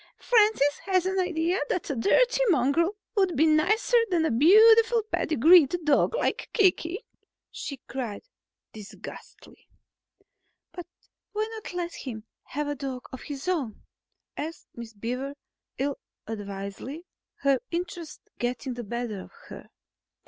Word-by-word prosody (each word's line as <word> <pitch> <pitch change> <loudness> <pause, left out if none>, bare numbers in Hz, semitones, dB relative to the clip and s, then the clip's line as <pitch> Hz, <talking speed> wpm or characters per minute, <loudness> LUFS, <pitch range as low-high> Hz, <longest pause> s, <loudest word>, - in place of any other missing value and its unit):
"Francis 420 - +3
has 375 -2 +2
the 380 +1 -1
idea 350 0 0
that 360 - -2
a - - -2
dirty - - +3
mongrel 335 - +2 0.2
would 380 -4 +2
be 310 - +5
nicer 390 +10 +3
than 340 -3 +2
a - - +1
beautiful 445 - +6
pedigreed 315 +2 +5
dog 300 +9 +3
like - - -1
Kiki," 375 -3 +1 0.5
she 280 - -6
cried 245 -6 -5 0.5
disgustedly. 210 -2 -12 1.0
"But 355 -1 -9 0.5
why 430 +1 -1
not 440 -1 -8
try 355 -1 -3
letting 310 -7 -6
him 220 -1 -9 0.2
have 295 +2 -3
a 290 - -1
dog 270 -3 -6
of 260 - -7
his 285 +1 -7
own?" 290 - -2 0.5
asked 320 +3 -6
Miss 235 -1 -9
Beaver 250 +6 -4 0.4
ill 280 +1 -2 0.3
advisedly, 205 - -6 0.4
her 275 -1 +3
interest 340 -2 -5 0.2
getting 250 +2 -2
the 240 0 -6
better 235 -2 -4
of - - -13 0.2
her. - - -10
310 Hz, 135 wpm, -27 LUFS, 250-365 Hz, 1.0 s, beautiful